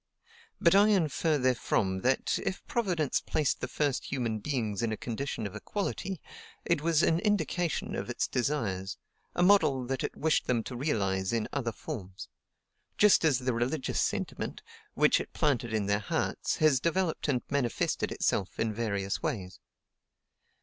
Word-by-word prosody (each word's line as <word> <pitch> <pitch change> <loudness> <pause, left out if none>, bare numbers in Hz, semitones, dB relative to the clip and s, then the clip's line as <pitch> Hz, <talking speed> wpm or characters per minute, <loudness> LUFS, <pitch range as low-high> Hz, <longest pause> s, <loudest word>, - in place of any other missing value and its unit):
But 170 - +5
I 200 +2 +6
infer 165 -5 +2
therefrom 115 -7 +1
that, 130 +4 +1
if 190 - -3
Providence 180 - 0
placed 150 -4 0
the - - -2
first 145 -3 -1
human 115 -5 -2
beings 110 -5 -2
in 115 -1 0
a 110 - -2
condition 120 -1 -4
of 100 - -6
equality, 195 -3 -3 0.5
it 170 -4 +1
was 165 0 +3
an 165 - +3
indication 185 -5 0
of - - -4
its - - -1
desires, 110 -8 -1 0.4
a 175 - +2
model 180 -10 +4
that 130 +1 -2
it - - -4
wished 160 0 +1
them 120 -3 +1
to 125 - -6
realize 95 -9 0
in 115 -2 0
other 125 -5 -1
forms; 100 - -7 0.7
just 210 -4 +6
as 150 -6 +4
the 130 0 -1
religious 130 +5 -1
sentiment, - - -3 0.3
which - - +4
it - - -7
planted 125 -6 +1
in 110 -2 0
their 100 +1 +1
hearts, 100 - -1
has 155 -4 +4
developed 170 +2 0
and 130 -4 +1
manifested 135 -4 0
itself 95 - -1
in 110 -1 0
various 100 -3 -2
ways. 95 -4 -3
130 Hz, 155 wpm, -30 LUFS, 110-160 Hz, 0.7 s, I